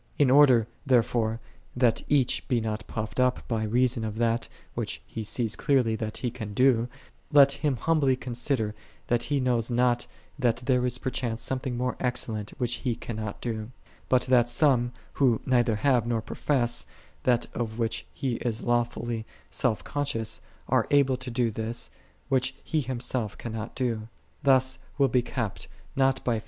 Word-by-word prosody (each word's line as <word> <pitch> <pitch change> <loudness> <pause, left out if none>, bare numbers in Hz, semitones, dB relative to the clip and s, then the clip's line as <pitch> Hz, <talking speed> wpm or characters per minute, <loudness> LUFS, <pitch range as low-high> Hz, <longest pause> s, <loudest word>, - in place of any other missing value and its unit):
In 135 -3 +4
order, 130 -5 +7 0.2
therefore, 115 -3 +2 0.4
that 125 -2 +3
each 135 -4 +1
be 125 - +2
not 110 -1 -3
puffed 110 +2 -4
up 125 0 +1
by 115 -2 -1
reason 120 +2 +1
of 110 0 -4
that, 115 0 +1 0.2
which - - -3
he 110 - -6
sees 115 +1 0
clearly 125 -6 +2
that 110 0 -4
he 125 - -2
can 110 -4 -7
do, 125 -2 +4 0.4
let 140 -2 +7
him 140 -1 0
humbly 140 0 +2
con 125 -1 -6
sider 120 -3 0 0.3
that 120 0 +1
he 145 -1 0
knows 125 -3 +1
not 120 0 +2 0.3
that 120 -3 +3
there 125 0 +1
is 125 0 0
per 130 - -3
chance 120 -3 -2
something 130 -2 -2
more 125 +1 -1
excellent 110 -4 -1
which 120 -2 0
he 125 -4 0
cannot 110 -3 -5
do, 110 -2 -3 0.4
but 130 -1 +4
that 125 -2 +4
some, 120 -2 +3 0.2
who 125 -5 +3
neither 120 -3 +3
have 120 0 +2
nor 115 -1 +1
profess 120 -3 0 0.3
that 120 -2 +2
of 115 -2 -3
which 115 -1 -1
he 130 -5 -2
is 115 -1 -2
lawfully 120 -1 0 0.3
self 120 -5 0
• 145 -4 -2
is, 110 0 -3 0.3
are - - +2
able 140 -2 +4
to 130 0 -6
do 120 -1 +1
this, 110 +2 -3 0.4
which 130 -1 +1
he 155 -2 0
him 130 -2 -3
sdt 120 -3 -2
cannot 110 -2 -6
do. 115 -4 -1 0.3
Thus 130 -1 +3 0.2
will 140 -1 +4
be 125 +1 +3
kept, 120 -4 -4 0.3
not 135 0 +2
by 115 -3 +1
120 Hz, 170 wpm, -27 LUFS, 115-130 Hz, 0.4 s, order